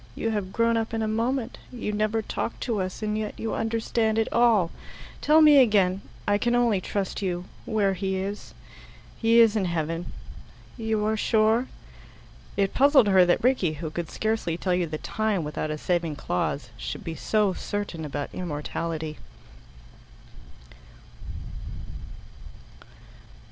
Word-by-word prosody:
"You 225 - -1
have 205 -3 -2
grown 230 +1 +2
up 225 0 -2
in 225 - -1
a - - 0
moment. 235 +3 -1
You 230 -4 -4
never 215 +1 0
talked 230 - -4
to 225 -5 -1
us, 185 +3 -4
and 210 0 -1
yet 215 -1 -4
you 225 - -2
understand 225 0 0
it 225 - +2
all. 225 -8 +4 0.5
Tell 310 +2 +5
me 300 -2 +8
again 200 -6 +4 0.3
I 205 0 +3
can 240 +2 +1
only 235 -6 +3
trust 195 +1 -3
you 180 -2 -2 0.2
where 205 -3 +1
he 190 +1 -2
is." 200 +2 -5 0.7
"He 230 0 +5
is 225 -2 +6
in 205 -3 +1
heaven." 165 0 -2 0.6
"You 220 -2 -1
are 220 +1 +1
sure?" 220 +3 +2 0.9
It 195 -1 +1
puzzled 275 -6 +5
her 185 -2 +6
that 175 - +2
Rickie, 240 -11 +2
who 155 +1 -5
could 170 0 -4
scarcely 220 -7 -1
tell 185 0 0
you 180 -1 +1
the 155 0 -4
time 215 0 -1
without 150 +1 -3
a 155 - -2
saving 170 -1 -1
clause, 125 +3 -2
should - - -5
be 165 -3 -4
so 205 +5 +1
certain 200 -4 -4
about 145 -1 -4
immortality. 160 -1 -4
205 Hz, 150 wpm, -26 LUFS, 175-225 Hz, 0.9 s, me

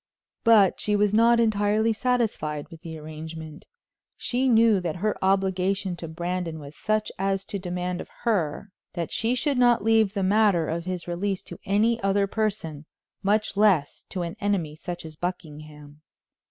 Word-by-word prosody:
But 220 -5 +5
she 210 - 0
was 205 0 +2
not 230 +2 +5
entirely 215 0 +2
satisfied 220 - -1
with 165 -1 -12
the 160 -1 -7
arrangement. 155 0 -9 0.5
She 255 +2 0
knew 225 -3 +5
that 170 -3 -3
her 210 +4 -1
obligation 190 0 +1
to 165 - -6
Brandon 170 0 -3
was 145 -1 -10
such 215 0 -1
as 195 0 0
to 200 - -4
demand 180 0 -3
of - - -10
her 200 -4 -1 0.2
that 170 -2 -4
she 230 +3 0
should 275 +1 0
not 240 -4 +4
leave 220 -2 +3
the 195 - 0
matter 195 -4 +3
of 170 +1 -3
his 180 -2 -4
release 185 +2 -2
to - - -10
any 220 +4 +2
other 195 0 +2
person, 175 -8 -3 0.3
much 210 +1 +1
less 195 -8 +2
to 185 -2 -3
an 170 +2 -5
enemy 190 -7 -1
such 175 +1 -7
as 155 -1 -9
Buckingham. 150 -3 -7
195 Hz, 165 wpm, -25 LUFS, 165-215 Hz, 0.5 s, But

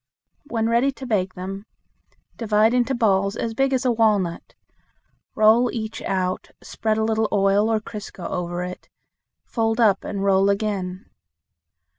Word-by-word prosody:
When 225 -4 -1
ready 235 +4 +2
to 265 - -9
bake 190 -6 -1
them, 195 +3 -7 0.7
divide 220 0 +2
into 250 +2 +1
balls 200 -3 +2
as 225 0 -3
big 270 +3 +1
as 260 0 0
a 250 - +3
walnut. 210 -7 0 0.8
Roll 220 +3 +5
each 220 -1 -5
out, 185 -1 -2
spread 215 -1 -2
a 220 - +1
little 220 0 +1
oil 200 +1 +3
or 220 - +2
crisco 210 -4 -8
over 175 0 -3
it; 180 0 -8 0.6
fold 225 0 -1
up 210 -5 +3
and 200 -1 -4
roll 195 0 +3
again. 200 -3 -2
215 Hz, 145 wpm, -23 LUFS, 195-225 Hz, 0.8 s, Roll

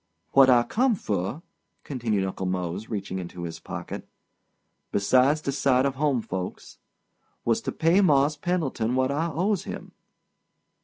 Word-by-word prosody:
"What 135 -1 +7
I 120 -2 +6
come 240 - +2
fur," 105 - -3 0.4
continued 115 -8 -1
Uncle 95 0 -3
Mose, 90 +3 -3
reaching 95 -3 -3
into 85 -1 -7
his 85 -1 -6
pocket—"besides 130 +9 -2
de 140 - -2
sight 135 -1 +2
of 140 - +1
home 135 -4 0
folks—was 95 +4 -6
to - - -3
pay 170 +4 +3
Mars' 145 -4 +4
Pendleton 145 -8 -1
what 130 +1 +2
I 155 +4 0
owes 185 +5 0
him. - - -7
130 Hz, 135 wpm, -26 LUFS, 100-150 Hz, 0.4 s, What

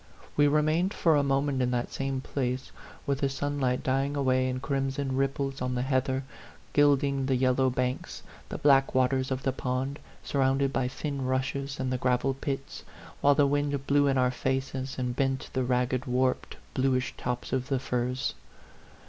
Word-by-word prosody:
We 145 0 +5
remained 155 +6 +2
for 165 -2 +3
a 145 - +4
moment 140 -1 +1
in 125 - +2
that 125 -1 -1
same 135 -1 -2
place, 130 -1 -3 0.3
with 140 -1 0
the 140 - +1
sun 145 +2 -2
light 125 -2 0
dying 135 +2 0
away 130 -2 +2
in 130 0 -2
crimson 135 0 -1
ripples 135 0 -1
on 125 0 -1
the 125 - 0
heather, 130 0 0 0.5
gilding 140 -2 +3
the 135 - +2
yellow 130 +1 +3
banks, 125 0 -3 0.3
the - - -4
black 135 -2 +4
waters 130 0 +2
of 130 -1 -2
the 135 - +1
pond, 130 +2 -2 0.2
surrounded 135 0 +1
by 130 -2 +1
thin 140 +1 -4
rushes, 135 +2 -2
and 130 -1 -1
the 125 - -1
gravel 125 +1 +1
pits; 135 0 -5 0.4
while 145 0 +5
the 145 - +4
wind 145 -1 0
blew 145 0 +3
in 135 -1 +2
our 125 -1 +3
faces, 130 +1 -2
and 125 -2 -2
bent 135 0 -1
the 130 - +1
ragged, 125 +1 0
warped, 125 +1 0 0.2
bluish 130 -1 0
tops 125 0 -4
of 130 -1 0
the 135 - +2
firs. 125 0 -1
135 Hz, 175 wpm, -28 LUFS, 130-140 Hz, 0.5 s, We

